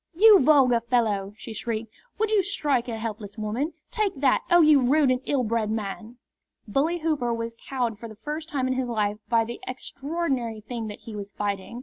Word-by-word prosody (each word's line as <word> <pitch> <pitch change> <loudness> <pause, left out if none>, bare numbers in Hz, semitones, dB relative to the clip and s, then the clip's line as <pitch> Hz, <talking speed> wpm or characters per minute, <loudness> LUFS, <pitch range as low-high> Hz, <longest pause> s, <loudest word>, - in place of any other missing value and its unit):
"You 420 +2 +8
vulgar 265 -4 +5
fellow!" 215 -4 0
she 225 - -8
shrieked. 225 0 -4 0.2
"Would 435 0 0
you 425 -2 +4
strike 295 -11 0
a 230 -2 -3
helpless 220 -2 -6
woman! 225 +9 -2 0.2
Take 430 -5 0
that! 270 -2 +3
Oh, 345 -1 +6
you 305 -2 +6
rude 275 +2 +4
and 255 0 0
ill 275 -3 +1
bred 225 -1 0
man!" 220 +2 -4 0.5
Bully 290 +10 +1
Hooper 300 -7 0
was 230 0 -3
cowed 240 -5 -1
for 230 - -7
the 215 - -11
first 300 +8 -6
time 275 -5 -1
in 260 - +1
his 255 -1 -1
life 210 -2 -1
by 230 -1 +3
the 235 +1 -7
extraordinary 265 -3 -3
thing 225 0 -5
that 210 - -8
he 225 - -9
was 205 0 -6
fighting. 200 +3 -4
240 Hz, 200 wpm, -25 LUFS, 220-290 Hz, 0.5 s, You